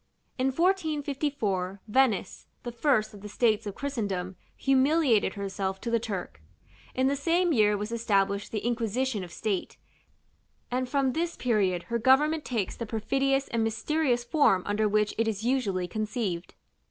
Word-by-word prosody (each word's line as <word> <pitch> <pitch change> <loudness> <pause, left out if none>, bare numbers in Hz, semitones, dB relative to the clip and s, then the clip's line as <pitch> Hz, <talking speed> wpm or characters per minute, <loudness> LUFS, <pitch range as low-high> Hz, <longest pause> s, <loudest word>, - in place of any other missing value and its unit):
In 260 - +2
1454, 280 - -1
Venice, 220 -5 +1 0.2
the 240 - -4
first 235 -3 +1
of 205 - -12
the 210 - -8
states 220 -1 +1
of 200 - -5
Christendom, 200 -10 -3 0.2
humiliated 270 -5 +3
herself 195 -1 -3
to 235 - -3
the 230 - +3
Turk: 195 - -5 0.5
in 260 - +2
the 275 +1 +2
same 335 +4 +2
year 210 -4 +3
was 210 +2 -4
established 200 -3 0
the 215 -1 -3
Inquisition 235 -1 -1
of 175 - -9
State, 195 +1 -3 0.9
and 255 0 -1
from 275 -2 +1
this 335 +2 -1
period 195 -8 +1
her 235 0 -2
government 295 +6 +3
takes 220 -7 -2
the 230 - -5
perfidious 270 +5 0
and 230 -1 0
mysterious 245 +3 0
form 240 - +3
under 210 +1 +1
which 210 0 +1
it 225 - +2
is 220 -1 -2
usually 215 -8 0
conceived. 210 -3 -3
230 Hz, 155 wpm, -28 LUFS, 205-270 Hz, 0.9 s, humiliated